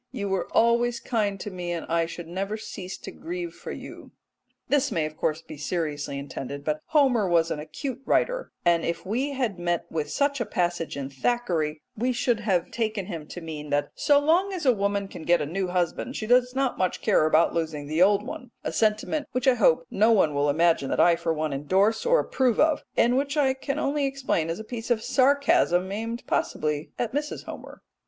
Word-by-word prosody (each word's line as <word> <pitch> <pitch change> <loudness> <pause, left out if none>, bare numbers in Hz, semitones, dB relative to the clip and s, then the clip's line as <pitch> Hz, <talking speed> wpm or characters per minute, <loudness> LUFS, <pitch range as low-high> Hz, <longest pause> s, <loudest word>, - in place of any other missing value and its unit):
You 200 -1 -3
were 190 -2 -1
always 235 +1 +3
kind 205 -5 -1
to 205 - -5
me, 180 -1 -4
and 170 -2 -3
I 165 0 +1
should 170 0 -8
never 195 +5 -3
cease 190 -3 -7
to - - -9
grieve 345 +1 -5
for - - -8
you." - - -9 0.6
This 280 -2 +2
may 165 -6 0
of 155 0 -6
course 155 +1 -1
be 155 - -10
seriously 150 -3 -3
intended, 140 0 -6
but 155 0 -1
Homer 260 - +3
was 165 -1 +3
an - - -2
acute 245 - -5
writer, - - 0
and 170 -1 +4
if 170 +2 -3
we 255 +9 -1
had 240 -9 -2
met 175 -1 -1
with 155 -2 -2
such 280 -2 0
a - - 0
passage 175 -5 -1
in 140 -1 -5
Thackeray 155 - -1
we 250 +4 0
should 240 -1 +1
have 190 -6 0
taken 215 -4 -2
him 165 -6 -6
to 175 - -8
mean 155 -2 -7
that 145 0 0
so 290 - +3
long 335 +7 +3
as 360 -5 -4
a 255 - +6
woman 200 -1 -1
can 195 - -9
get 170 +1 +3
a 150 - -1
new 185 +5 -2
husband, 180 +8 -1
she 215 - -3
does 250 +2 +3
not 270 -2 0
much 185 -1 -1
care 155 - +4
about 160 +2 +3
losing 160 -3 -2
the 155 +3 -1
old 200 +2 +5
one 250 - -7
a - - -3
sentiment 220 +7 0
which 255 +1 -1
I 260 - +7
hope - - +3
no 220 +3 +4
one 175 -9 +4
will 145 +1 +1
imagine 160 -2 +2
that - - -1
I 175 -1 +6
for 170 0 -2
one 155 -1 -1
moment 135 0 -3
endorse 200 - +2
or - - +5
approve 255 -4 +1
of, 310 -1 +3
and 245 +2 +4
which 280 +2 -1
I 270 -3 +3
can 275 +1 -4
only 285 -1 0
explain 265 -12 -1
as 165 - -2
a 220 - -6
piece 230 +1 -6
of 225 -2 +1
sarcasm 275 - +3
aimed 230 +3 -4
possibly 150 0 -1
at 235 -1 -2
Mrs. 295 +1 -3
Homer. - - -10
200 Hz, 215 wpm, -26 LUFS, 165-255 Hz, 0.6 s, I